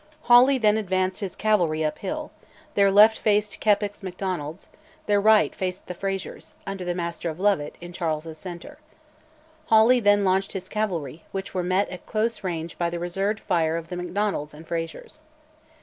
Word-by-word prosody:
Hawley 250 +3 +6
then 215 -3 +3
advanced 185 -2 -1
his 195 -4 -5
cavalry 175 -8 +1
up 155 - -2
hill: 300 +8 -4 0.4
their 200 -1 +4
left 210 +3 +6
faced 210 -1 +1
Keppoch's 205 -1 +1
Macdonalds; 180 -3 -5 0.4
their 205 -1 +2
right 215 +1 +5
faced 185 -1 -4
the 180 - -6
Frazers, 195 +1 -5
under 195 -1 -5
the 175 0 -2
Master 170 -1 -3
of 160 +1 -7
Lovat, 190 -7 +1
in 175 0 -9
Charles's 160 -2 -3
centre. 185 - -9 0.9
Hawley 225 +3 +6
then 205 -2 +3
launched 190 +1 +1
his 185 -1 -6
cavalry, 170 -8 -3
which 195 0 -5
were 185 - 0
met 185 +3 +1
at 180 - -10
close 225 0 -1
range 170 -3 -4
by 170 -1 +1
the 170 - -4
reserved 195 +5 -2
fire 165 -4 +1
of 165 0 -7
the 180 - -4
Macdonalds 180 -4 -2
and 160 +2 -13
Frazers. 165 - -5
190 Hz, 170 wpm, -25 LUFS, 170-210 Hz, 0.9 s, Hawley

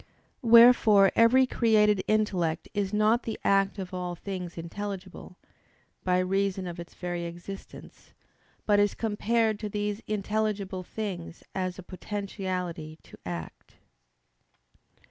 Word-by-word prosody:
Wherefore 230 -4 +7
every 245 +3 +5
created 210 -5 +3
intellect 190 -7 0
is 200 -2 -1
not 215 +3 +3
the 225 - -5
act 195 +1 +2
of 190 -2 -6
all 180 -1 -3
things 180 -1 -6
intelligible, 185 +1 -7 0.7
by 180 -1 +2
reason 190 +1 0
of 175 -1 -6
its 170 - -10
very 175 -1 -4
existence; 175 +3 -10 0.5
but 205 -1 +4
is 205 -1 +2
compared 220 0 0
to 210 - -4
these 205 +1 -3
intelligible 210 -2 -2
things 185 -3 -6
as 185 -1 -3
a 185 - -9
potentiality 185 -4 -5
to - - -14
act. 85 -2 -7
195 Hz, 120 wpm, -28 LUFS, 180-215 Hz, 0.7 s, Wherefore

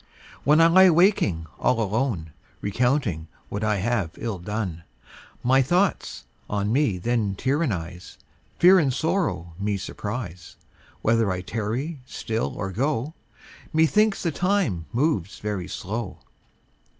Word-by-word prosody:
When 150 +4 +5
I 165 - +7
lie 185 +3 +7
waking 165 - +3
all 120 - +2
alone, 105 - -1 0.3
Recounting 115 - 0 0.2
what 100 +2 -4
I 105 -1 +2
have 100 -3 0
ill 110 -5 -4
done, 95 -3 -4 0.6
My 130 +2 +4
thoughts 180 +9 0 0.2
on 105 +1 -1
me 135 -8 +2
then 105 0 0
tyrannise, 95 - -2 0.4
Fear 185 +2 +7
and 140 -5 +2
sorrow 150 - -1
me 100 0 -1
surprise, 100 -2 -6 0.5
Whether 115 -2 +3
I 90 0 -2
tarry 115 - -3
still 115 -2 -3
or 95 -1 -4
go, 135 - -1 0.6
Methinks 195 +7 +3
the 170 - +1
time 175 - 0
moves 120 - 0
very 100 -4 -4
slow. 105 +1 -5
115 Hz, 125 wpm, -24 LUFS, 95-150 Hz, 0.6 s, I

